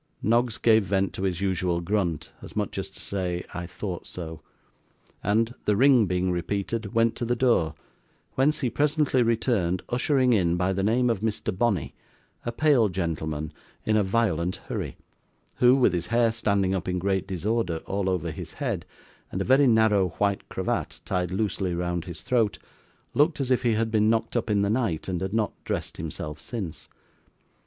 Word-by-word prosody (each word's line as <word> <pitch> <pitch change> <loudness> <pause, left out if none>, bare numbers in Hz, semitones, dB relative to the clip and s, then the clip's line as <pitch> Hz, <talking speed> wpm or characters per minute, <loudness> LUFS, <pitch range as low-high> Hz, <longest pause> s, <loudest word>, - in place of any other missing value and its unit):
Noggs 120 +1 +2
gave 110 -3 +4
vent 95 +1 0
to - - -5
his 95 -2 -1
usual 90 -3 0
grunt, 85 -4 -1
as - - -10
much - - -2
as - - -4
to - - -12
say 90 -3 -2
'I 90 -1 -4
thought 90 0 -6
so!' 80 -3 -7 0.8
and, 110 +4 +2
the 105 - +3
ring 125 -2 +5
being 90 0 0
repeated, 100 +4 -2
went 115 0 +3
to - - -3
the 120 +1 +1
door, 115 -11 +2 0.6
whence 150 +4 +2
he 125 -4 0
presently 150 -3 +2
returned, 110 -6 +1
ushering 125 0 +2
in, 90 -5 +2
by 90 +2 +1
the 95 - -1
name 115 +5 +2
of 115 - -1
Mr. 110 -3 -2
Bonney, 100 - 0 0.5
a 120 - -2
pale 125 -4 +3
gentleman 80 -4 -3 0.3
in 110 - +2
a 105 - +4
violent 95 -4 +1
hurry, - - -4 0.6
who, 125 +1 +6
with 125 -8 +3
his 85 -1 -2
hair 115 0 +3
standing 100 -4 +1
up 95 -3 -2
in 90 0 0
great 95 0 0
disorder 95 -2 -1
all 100 -1 -1
over 90 -3 -1
his - - -7
head, - - -3 0.4
and 95 - -3
a 95 - -1
very 135 +2 +5
narrow 110 -4 +4
white 100 -1 0
cravat - - -2
tied 90 -2 -1
loosely 95 -2 -1
round 85 -1 -2
his 85 -4 -8
throat, 110 -6 +1 0.6
looked 150 +2 +3
as 130 -2 -1
if 125 - +3
he 120 -2 +2
had 110 0 0
been 110 -1 +3
knocked 115 0 0
up - - 0
in 100 -1 +2
the 100 - +1
night 110 -10 -1
and 90 -2 -2
had 95 0 -2
not 110 -1 0
dressed - - -3
himself 75 0 -5
since. 95 -1 -6
100 Hz, 180 wpm, -26 LUFS, 90-115 Hz, 0.8 s, who